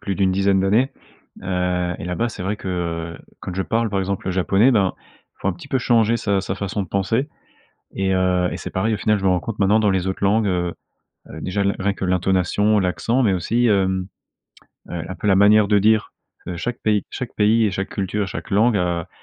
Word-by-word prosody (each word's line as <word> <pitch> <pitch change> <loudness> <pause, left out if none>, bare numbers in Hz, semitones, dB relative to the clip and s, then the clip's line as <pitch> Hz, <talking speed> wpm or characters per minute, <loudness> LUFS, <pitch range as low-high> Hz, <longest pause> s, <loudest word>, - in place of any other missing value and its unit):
plus 100 - -3
d'une 95 -1 +1
dizaine 95 0 +2
d'années, 110 +8 +2 0.5
heu, 90 -1 -1
et - - -6
là-bas, 90 +7 -1
c'est 105 -4 -7
vrai 100 +3 -2
que 85 -3 -4 0.2
quand 90 - -6
je 95 - -1
parle, 115 +2 0
par 100 - -1
exemple, 95 0 -3
le 95 - 0
japonais, 95 +6 +3
ben, 100 -6 +2
il - - -29
faut - - -1
un - - +1
petit 155 -5 -12
peu 130 - +1
changer 115 -1 +3
sa 100 -4 0
sa 95 0 -4
façon 100 +1 -3
de 95 - -8
penser 115 - 0 0.7
et 95 -1 0
heu, 90 -1 +2
et - - -3
c'est - - -7
pareil, 110 +4 0
au - - -1
final, 105 -1 +1
je 95 - -6
me - - +4
rends 90 -1 +2
compte 115 +1 -6
maintenant 105 +2 +3
dans 105 -2 +3
les 95 -1 0
autres 95 +1 -2
langues, 105 +2 +2
heu 90 -2 -1 0.6
heu, 80 - -9
déjà 95 +4 -2
l 100 0 +1
rien 100 +1 0
que 95 - -4
l'intonation, 95 +3 +2
l'accent, 110 +7 0
mais 100 -5 +3
aussi, 115 +7 +1
hem, 95 -3 +1 0.8
heu, 85 -2 -4
un 95 - -5
peu - - -6
la 95 -2 +4
manière 105 +1 +5
de 105 - +4
dire 110 +1 +2 0.3
de 90 - -4
chaque 120 +6 -4
pays 105 -2 +1
chaque 125 - -6
pays 110 +2 +3
et - - 0
chaque 95 0 -3
culture, 100 +1 -2
chaque 95 - -7
langue 110 +3 +3
à 85 -3 -1
95 Hz, 230 wpm, -21 LUFS, 95-110 Hz, 0.8 s, manière